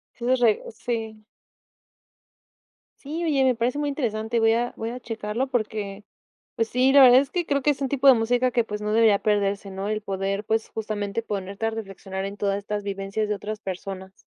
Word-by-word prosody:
Tienes 250 +1 +1
raz 220 -1 +1
sí. 220 -2 -4 1.7
Sí, 315 +5 -5
oye, 280 -4 +2
me 255 -2 +3
parece 240 +4 -1
muy 290 - 0
interesante, 230 -4 -1
voy 225 0 +4
a 240 +1 -1
voy 225 - -3
a 250 - -6
checarlo 225 +2 -3
porque, 210 -4 -3 0.5
pues 225 0 0
sí, 255 +2 +3
la 280 - +8
verdad 255 0 +9
es 280 0 -4
que 350 -2 -2
creo 280 -2 0
que 295 - +3
es 280 - -2
un 270 - 0
tipo 275 0 +3
de 265 - +10
música 245 +2 +1
que, 235 -1 +1
pues, 210 -1 -5
no 210 0 -2
debería 220 -3 +4
perderse, 200 -1 0
¿no? 195 +1 -4
El 215 0 -2
poder, 195 +1 -2
pues, 220 +1 0
justamente, 215 0 -3
ponerte 200 0 -4
a - - +1
reflexionar 195 -3 -6
en 200 +1 -5
todas 200 -1 0
estas 205 0 -4
vivencias 200 +1 -3
de 210 - 0
otras 210 +1 -6
personas. 190 0 -6
220 Hz, 200 wpm, -25 LUFS, 200-245 Hz, 1.7 s, de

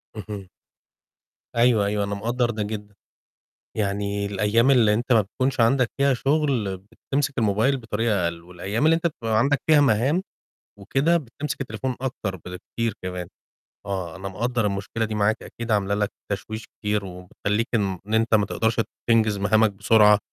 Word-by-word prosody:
اهم. 105 -2 -7 1.1
أيوه، 115 -3 +4
أيوه، 100 0 0
أنا 100 0 -2
مقدَّر 120 +4 0
ده 110 -2 -2
جدًا. 105 -1 -6 0.8
يعني 100 0 -1
الأيام 105 +6 +2
اللي 115 -5 +5
أنت 120 +4 -2
ما 115 - +6
بتكونش 130 +7 -2
عندك 120 +1 +4
فيها 140 0 +3
شغل 135 -7 0 0.3
بتمسك 140 0 0
الموبايل 115 +5 +2
بطريقة 110 -4 0
أقل، 85 0 -2
والأيام 90 - -3
اللي 160 +1 +6
أنت 170 +1 +1
بتبقى 115 -8 -2
عندك 140 +4 +2
فيها 150 -2 +7
مهام 140 - +2 0.6
وكده 135 - +2
بتمسك 145 -1 -4
التليفون 130 0 -3
أكتر 120 -7 -3
بكتير 95 +5 -4
كمان. 90 -1 -5 0.6
آه، 95 -5 -4
أنا 95 +1 -6
مقدَّر 115 +4 -1
المشكلة 100 +3 -2
دي 110 0 -4
معاك، 105 +1 +2
أكيد 115 0 -6
عاملة 100 -1 +2
لك 105 -1 0 0.2
تشويش 110 +2 -4
كتير 105 -1 -2
وبتخلّيك 95 +4 -3
إن 100 -1 -2
أنت 110 0 +3
ما 105 -1 +3
تقدَرش 110 +3 0 0.3
تنجز 110 -3 +3
مهامك 105 +2 +3
بسرعة 105 +1 +5
110 Hz, 155 wpm, -24 LUFS, 100-120 Hz, 1.1 s, فيها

